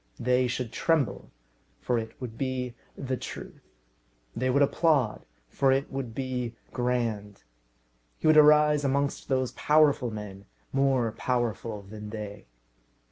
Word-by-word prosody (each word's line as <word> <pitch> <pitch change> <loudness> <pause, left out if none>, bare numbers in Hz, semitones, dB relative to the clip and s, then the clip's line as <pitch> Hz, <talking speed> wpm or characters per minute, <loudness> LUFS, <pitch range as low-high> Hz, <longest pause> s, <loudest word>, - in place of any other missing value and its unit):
They 125 +1 +2
should 120 -1 -3
tremble, 145 - 0 0.5
for 120 -2 0
it 110 0 -8
would 120 -3 -6
be 130 -1 -3 0.2
the 130 -1 -2
truth. - - -8 0.7
They 130 +1 0
would 140 +3 +4
applaud, 140 -6 +1 0.2
for 135 - +2
it 135 +1 0
would 130 -5 -5
be 125 -3 -3 0.2
grand. 115 -5 -2 0.7
He - - -7
would 155 0 +6
arise 150 -1 +6
amongst 140 +1 0
those 130 -2 +1
powerful 150 -4 +3
men, 105 -2 -8 0.3
more 135 -4 +2
powerful 115 -3 -2
than 105 +1 -9
they. 105 - -7
125 Hz, 130 wpm, -28 LUFS, 110-135 Hz, 0.7 s, would